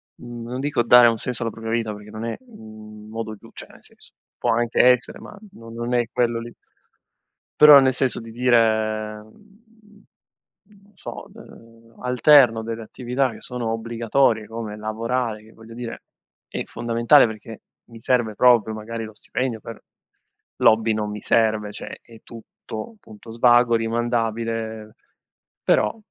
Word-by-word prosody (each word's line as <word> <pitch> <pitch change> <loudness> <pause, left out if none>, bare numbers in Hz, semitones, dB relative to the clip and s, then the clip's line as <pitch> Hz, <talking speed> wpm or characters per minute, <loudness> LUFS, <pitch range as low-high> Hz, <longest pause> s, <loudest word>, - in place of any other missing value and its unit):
mhmm, 120 -1 -9
non 125 - -4
dico 145 -3 0
dare 120 +1 +7
un 115 - +2
senso 120 +1 -2
alla 115 - -2
propria 110 +1 -7
vita 115 -2 -1
perché 105 0 -13
non 110 +1 -7
è, 115 - -3
mhmm, 110 - -14
un - - -14
modo 110 0 -6
giu 100 - -17
cioè - - -8
nel - - -19
senso, - - -14 0.3
può 120 - 0
anche 120 0 +1
essere 125 0 +2
ma - - -12 0.2
no 115 -8 -13
non 120 +2 -5
è 120 -2 +1
quello 120 -1 0
lì. 120 0 -9 1.1
Però 150 -2 +10
nel 130 -1 +2
senso 130 -1 0
di 115 0 -11
dire, 110 -3 +1
mhmm, 210 - -21 0.8
non 205 - -25
so, - - -9
uhm, 115 - -17
alterno 125 -2 +5
delle 115 0 -6
attività 125 +3 -2
che - - -12
sono 120 -3 -4
obbligatorie 115 0 0
come 115 -2 -7
lavorare 110 +1 -3
che, 110 - -18
voglio 115 +1 -14
dire, 120 -1 -7 0.4
è - - -5
fondamentale 120 +4 +3
perché 110 0 -9 0.2
mi 115 -1 -13
serve 115 -2 0
proprio 115 -4 +4
magari 115 +1 -6
lo 110 -1 -8
stipendio 120 +2 -4
per 115 0 -11 0.8
l'hobby 110 0 +3
non 105 -1 -3
mi 105 0 -6
serve, 110 -2 +1
cioè - - -8
è 115 -1 -17
tutto 115 - -10
punto 110 - -13
svago, 120 0 +4
rimandabile, 115 -1 -2 0.7
però - - +2
115 Hz, 160 wpm, -22 LUFS, 110-125 Hz, 1.1 s, Però